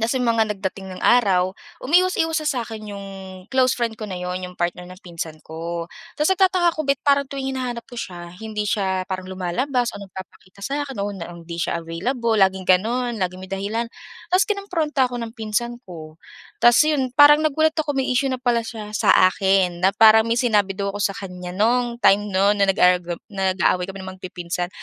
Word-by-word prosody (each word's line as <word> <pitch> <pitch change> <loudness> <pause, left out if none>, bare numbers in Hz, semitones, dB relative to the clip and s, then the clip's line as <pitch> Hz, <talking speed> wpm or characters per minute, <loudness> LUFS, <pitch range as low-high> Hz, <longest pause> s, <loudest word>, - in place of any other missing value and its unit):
tapos 230 +4 0
yung 245 - +1
mga 230 -1 +3
nagdating 195 -1 -5
ng - - -10
araw, 190 -6 +4 0.3
umiiwas-iwas 325 0 +2
sa 280 -5 0
sa'kin 215 -2 -7
yung 200 0 -8 0.4
close 260 -1 +3
friend 230 -2 -2
ko - - -4
na 185 - -5
yun, 180 0 -3
yung 180 - -8
partner 175 +1 -2
ng 185 - -11
pinsan 165 -3 -7
ko. 165 +1 -5 0.3
Tapos 300 +4 +2
nagtataka 370 -2 +3
ako 310 - -2
ba't 275 -2 +2
parang 280 -1 +4
tuwing 270 -1 -4
hinahanap 245 -2 -3
ko 245 - -11
siya 175 -4 -7
hindi 215 0 -4
siya 190 -3 0
parang 185 -1 -4
lumalabas 235 +8 -1
o - - -9
nagpapakita 190 0 -12
sa 285 +3 -2
akin 270 -7 -7
o 200 +1 -2
na 175 -1 -7
hindi 170 0 -9
siya 170 +1 -1
available, 225 +8 -1
laging 190 -2 +2
ganun, 235 +6 +2
laging 185 0 -2
may 190 - -9
dahilan. 205 +4 -2 0.4
Tapos 365 +2 +3
kinompronta 335 - 0
ako 245 - -6
ng 230 -1 -6
pinsan 235 +2 -2
ko. 160 -3 -11 0.4
Tapos 240 0 +6
yun 290 -4 +1
parang 295 0 +8
nagulat 315 +1 +2
ako 295 -2 -2
may 265 -1 0
issue 270 +2 +1
na 260 - -1
pala 240 -2 +2
siya 215 -2 -7
sa 215 - 0 0.2
akin 190 -3 +1
na 190 +2 +3
parang 220 0 +6
may 230 - +1
sinabi 205 -6 +1
daw 200 0 -2
ako 205 - -6
sa - - -12
kanya 180 -4 -7
nung 240 +3 +1
time 205 +1 +4
nun 200 +1 +2
na 200 - +3
nag 195 - +2
argu 180 -1 +3 0.2
nag-aaway 190 -1 +1
kami 195 0 -7
na 190 - -7
magpipinsan. 175 -1 -4
210 Hz, 200 wpm, -22 LUFS, 185-250 Hz, 0.4 s, parang